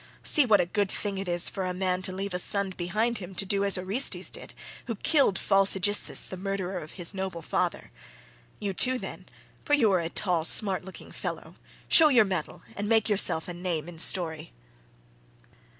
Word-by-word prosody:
See 295 -5 +4
what 210 -3 +5
a 180 - +2
good 200 +2 -1
thing 200 -1 -3
it 195 - -5
is 175 0 +3
for 190 - -4
a 180 -1 -3
man 185 0 -1
to 185 - -4
leave 195 +1 -5
a 180 - -2
son 200 +1 +2
behind 210 +6 -2
him 185 0 -10
to 195 - -2
do 200 +1 +1
as 200 -1 +2
Orestes 195 +8 0
did, - - -10 0.3
who 230 - -3
killed 270 - +2
false 195 -1 +2
Aegisthus 205 +2 0
the 185 - -8
murderer 190 -1 -4
of 155 - -11
his 175 0 0
noble 190 -3 -5
father. - - -3 0.7
You 200 -2 -4
too, 255 +6 +5
then—for 290 +3 -5
you 230 -8 +3
are 185 - +2
a 165 -1 -3
tall 175 -3 0
smart 190 +3 +3
looking 190 0 -11
fellow—show 320 - +1
your 240 -6 +5
mettle 185 -5 -5
and 205 +1 -4
make 225 -1 +2
yourself 190 -5 +1
a 175 - -5
name 175 -3 -4
in 170 -2 -10
story." 160 - +1
190 Hz, 190 wpm, -27 LUFS, 180-205 Hz, 0.7 s, what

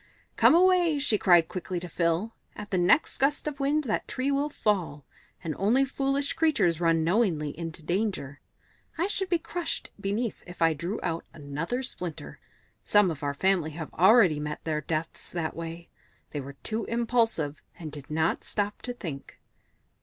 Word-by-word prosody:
"Come - - +6
away," 355 -3 +4
she 250 -7 +2
cried 175 -3 +5
quickly 180 0 -4
to 180 - -7
Phil; 170 +6 0 0.2
"at 210 -1 -8
the 185 - +2
next 175 - +3
gust 285 +3 +1
of 295 -2 -4
wind 290 +2 +1
that 225 -6 -2
tree 265 +2 -1
will 280 +2 +1
fall, 180 - -1 0.4
and 160 -3 -3
only 240 +8 +3
foolish 275 +1 0
creatures 200 - +2
run 165 -1 +3
knowingly 165 -5 +1
into 165 -1 -7
danger. 175 -6 -2 0.6
I 340 - +1
should 385 -1 -2
be 345 - +3
crushed 335 +1 -4
beneath 205 +3 -2
it - - -22
if 180 - -11
I 165 -1 +4
drew 170 +8 -4
out 165 0 -2
another 160 - -3
splinter. 180 - -6 0.4
Some 205 -4 +4
of 155 - -7
our 140 -1 -2
family 175 -2 +1
have 160 -1 -7
already 185 -4 +5
met 150 0 -5
their 155 -1 -1
deaths 155 +2 -4
that 165 -3 -2
way; 165 +1 -7 0.4
they 145 - -3
were 140 +1 -8
too 220 0 -2
impulsive, 230 - 0 0.2
and 160 -3 -7
did 145 -2 -10
not 160 +1 0
stop 205 0 -2
to 245 - -3
think." 155 - -7
185 Hz, 175 wpm, -28 LUFS, 160-245 Hz, 0.6 s, Come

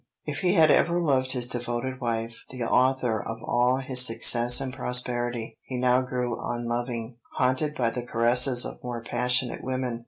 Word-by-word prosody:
If 145 -2 -4
he 180 +1 +1
had 160 -3 +5
ever 170 0 +2
loved 135 -6 +1
his 125 -2 +1
devoted 120 +2 -4
wife, 115 -1 -4
the 125 -2 -6
author 125 -3 +1
of 115 +2 -6
all 125 +1 +1
his 125 -1 +5
success 120 +1 +4
and 135 -2 -4
prosperity, 120 -2 -1
he 130 - -7
now 125 0 +2
grew 125 -2 -4
unloving, 120 0 -4 0.2
haunted 130 +4 0
by 120 -5 0
the 125 - -5
caresses 120 +1 +3
of - - -8
more 120 -2 -6
passionate 125 +1 -1
women. 130 -2 -3
125 Hz, 165 wpm, -25 LUFS, 120-130 Hz, 0.2 s, had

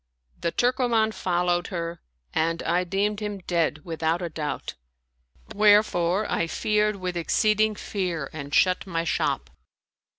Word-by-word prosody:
The 170 - -1
Turkoman 240 -2 +2
followed 175 -1 0
her 170 -1 -4 0.3
and 165 +1 0
I 175 +2 +1
deemed 200 +3 -1
him 210 -1 -4
dead 165 -3 0
with 165 -2 -6
out 165 +3 +1
a 170 - -2
doubt; 155 -1 -4 0.8
wherefore 205 -2 +4
I 170 - 0
feared 210 +4 +1
with 185 -2 -4
exceeding 215 +5 +2
fear 180 -9 -3
and 145 -2 -7
shut 185 +4 +3
my 165 -2 -1
shop. 170 - -1
180 Hz, 135 wpm, -25 LUFS, 170-210 Hz, 0.8 s, wherefore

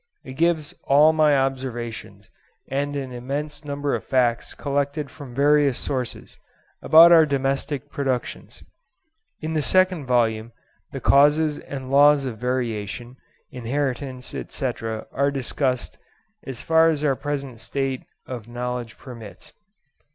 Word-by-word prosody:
It 130 - -9
gives 160 +1 +1
all 150 +3 +6
my 155 -2 +4
observations 130 -4 -4 0.4
and 145 +2 -2
an 135 -2 -4
immense 145 +4 -4
number 145 0 -2
of - - -2
facts 125 -3 0
collected 140 +1 -2
from 140 -6 -11
various 145 -1 +3
sources, 130 -4 -4 0.4
about 165 +2 +8
our 165 -1 +8
domestic 140 0 -2
productions. 130 -4 -4 0.8
In 160 0 -3
the 155 - +1
second 185 -3 +2
volume 115 -2 +1 0.4
the 135 - -6
causes 150 +2 +4
and 135 -2 -7
laws 145 0 +5
of 115 -5 -5
variation, 120 -1 -3 0.3
inheritance, 130 0 -3
etc., 115 -5 -4
are 140 +1 +1
discussed 130 -2 -2 0.5
as 130 -3 -6
far 160 0 +4
as 150 -2 -1
our 140 -3 +2
present 140 -3 -5
state 135 +2 -2 0.2
of 120 -4 -7
knowledge 120 -1 -5
permits. 115 -6 -11
135 Hz, 125 wpm, -23 LUFS, 125-145 Hz, 0.8 s, about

